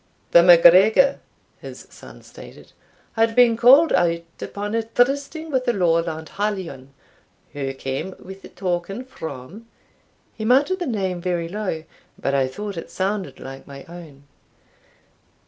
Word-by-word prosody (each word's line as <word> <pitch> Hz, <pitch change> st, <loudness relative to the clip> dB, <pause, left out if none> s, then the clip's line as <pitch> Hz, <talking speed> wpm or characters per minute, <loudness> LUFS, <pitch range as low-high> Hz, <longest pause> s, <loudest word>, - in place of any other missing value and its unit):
"The 170 Hz, -, +7 dB
MacGregor," 185 Hz, +10 st, +6 dB, 0.4 s
his -, -, -11 dB
son -, -, -14 dB
stated, -, -, -14 dB, 0.4 s
"had 225 Hz, 0 st, +1 dB
been 245 Hz, -2 st, +5 dB
called 265 Hz, +8 st, +6 dB
out 170 Hz, -1 st, +1 dB, 0.2 s
upon 205 Hz, +1 st, -5 dB
a 230 Hz, -, +1 dB
trysting 275 Hz, +7 st, -1 dB
with 260 Hz, -2 st, -1 dB
a 240 Hz, -, +2 dB
Lowland 165 Hz, -4 st, 0 dB
hallion, 190 Hz, -10 st, -4 dB, 0.6 s
who 135 Hz, -2 st, -4 dB
came 135 Hz, +8 st, -5 dB
with 190 Hz, +1 st, -12 dB
a -, -, -11 dB
token 190 Hz, +5 st, -4 dB
from" 160 Hz, -, -9 dB, 0.7 s
he 220 Hz, -, -7 dB
muttered 280 Hz, -, +2 dB
the 350 Hz, -, -3 dB
name 190 Hz, -7 st, -2 dB
very 175 Hz, -2 st, -2 dB
low, 185 Hz, -4 st, -4 dB, 0.3 s
but 140 Hz, -, -2 dB
I 135 Hz, -1 st, +2 dB
thought 200 Hz, +7 st, -7 dB
it 165 Hz, -, -7 dB
sounded 195 Hz, +1 st, -3 dB
like 135 Hz, 0 st, -10 dB
my 140 Hz, -1 st, -11 dB
own. 165 Hz, -5 st, -13 dB
190 Hz, 140 wpm, -22 LUFS, 165-230 Hz, 0.7 s, The